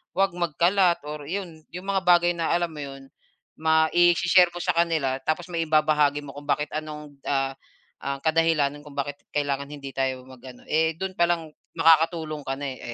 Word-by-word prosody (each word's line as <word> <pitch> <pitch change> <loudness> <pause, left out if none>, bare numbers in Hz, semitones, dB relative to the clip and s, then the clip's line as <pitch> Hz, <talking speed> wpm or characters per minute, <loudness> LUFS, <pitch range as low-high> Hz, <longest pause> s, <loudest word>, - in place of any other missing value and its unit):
huwag 195 0 +2
magkalat, 175 +1 +2
or 150 -1 -7
'yon 170 -3 -6
yung 180 - -6
mga 195 0 0
bagay 175 0 +5
na 170 -2 -2
alam 175 -1 0
mo 150 - -9
yun, 135 -1 -9 0.5
ma-i-she-share 170 +3 +4
mo 175 - -4
sa - - +2
kanila, 160 -6 +1
tapos 165 +6 -3
maibabahagi 155 -3 +2
mo 140 - -8
kung 145 +1 -11
bakit 150 +1 0
anong, 150 -2 -7
ah, 135 -1 +1 0.5
ah, 140 0 -4
kadahilanan 160 -3 +2
kung 140 - -12
bakit 145 0 -3 0.2
kailangan 140 -1 -1
hindi 140 -2 -8
tayo 130 -1 -2
mag 130 -1 -14
ano 125 -1 -12
eh, 160 +1 +2
dun 190 +2 -4
palang 170 -2 +1 0.2
makakatulong 160 -1 +3
ka 135 - -1
na, 140 0 -4
eh, 130 - -10
155 Hz, 175 wpm, -25 LUFS, 140-170 Hz, 0.5 s, bagay